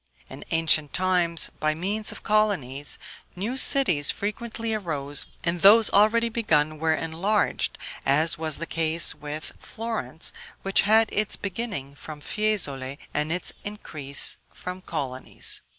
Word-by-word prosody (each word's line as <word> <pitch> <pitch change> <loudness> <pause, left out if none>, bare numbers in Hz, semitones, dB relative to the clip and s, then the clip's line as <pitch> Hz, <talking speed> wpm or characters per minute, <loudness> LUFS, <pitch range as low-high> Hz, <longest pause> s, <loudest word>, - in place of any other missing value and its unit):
In - - -9
ancient 160 -2 +3
times, 180 -3 +2
by 155 0 +1
means 205 +6 -2
of - - -10
colonies, 180 - 0 0.4
new 210 +8 -3
cities 220 - +4
frequently 225 +2 -3
arose, 145 -8 -3 0.2
and 170 0 -1
those 215 +3 +7
already 220 +3 +4
begun 155 -10 +1
were 160 0 +2
enlarged, 170 +7 -1 0.3
as 155 +4 +3
was 160 -2 -2
the 170 - -4
case 165 0 +3
with 150 +1 -5
Florence, 220 - -5 0.3
which 195 0 +3
had 220 +1 +6
its 210 0 0
beginning 195 - -5
from 150 +1 -9
Fiesole, 145 -9 -2 0.2
and 150 +1 -1
its 180 +2 0
increase 155 -9 -1
from 180 +1 -7
colonies. 135 -7 -2
170 Hz, 130 wpm, -25 LUFS, 150-215 Hz, 0.4 s, those